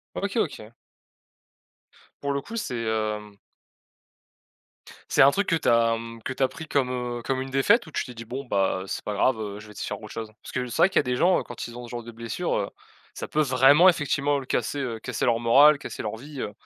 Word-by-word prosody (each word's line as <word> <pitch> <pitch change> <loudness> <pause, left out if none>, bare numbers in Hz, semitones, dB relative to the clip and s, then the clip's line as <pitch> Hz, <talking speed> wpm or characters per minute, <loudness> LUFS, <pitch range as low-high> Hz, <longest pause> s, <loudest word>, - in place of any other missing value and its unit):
OK, 200 +3 -2
OK. 115 -7 -4 1.5
Pour 140 0 -1
le 140 - -1
coup, 230 +10 -8
c'est, 125 - -3
hem 105 -1 -2 1.8
c'est - - +5
un 135 - +8
truc 200 +6 -1
que 165 - +3
tu - - -1
as, 115 -1 +4
mmh, 115 0 -8
que - - -2
tu 130 - -4
as 130 - +4
pris 150 +5 -9
comme, 135 -4 +1
heu, 120 -1 -3
comme 130 +1 -1
une 135 - -7
défaite? 150 - +3
Ou - - -11
tu - - -1
t'es 125 - -10
dit: 115 0 -8
«Bon 130 +4 -6
bah 95 -5 0
c'est - - -5
pas 105 - -3
grave, 115 +3 +2
heu, 105 -1 -5
je 105 - -12
vais 105 - -12
essayer - - -6
de - - -4
faire 105 - -5
autre 105 - -9
chose»? 110 -1 -6
Parce - - -10
que, 125 -1 -2
c'est 120 - -6
vrai - - +7
qu'il 190 - +2
y - - +6
a - - 0
des 125 0 -1
gens, 180 +7 +4
heu, - - -4
quand 120 - -7
ils 120 - -10
ont 120 0 -7
ce - - -12
genre 120 -1 -5
de 120 - -9
blessure, 115 +10 -3
heu, 100 - -2 0.5
ça - - -6
peut 155 - 0
vraiment 140 +6 +6
effectivement 145 -4 +2
lui 130 - -7
casser, 145 - -1
heu, 120 -4 -3
casser - - -3
leur 115 -2 +3
moral, 140 +6 +6
casser - - -7
leur 105 +1 -4
vie, 140 +3 -9
heu, 105 - -4
125 Hz, 260 wpm, -25 LUFS, 115-140 Hz, 1.8 s, un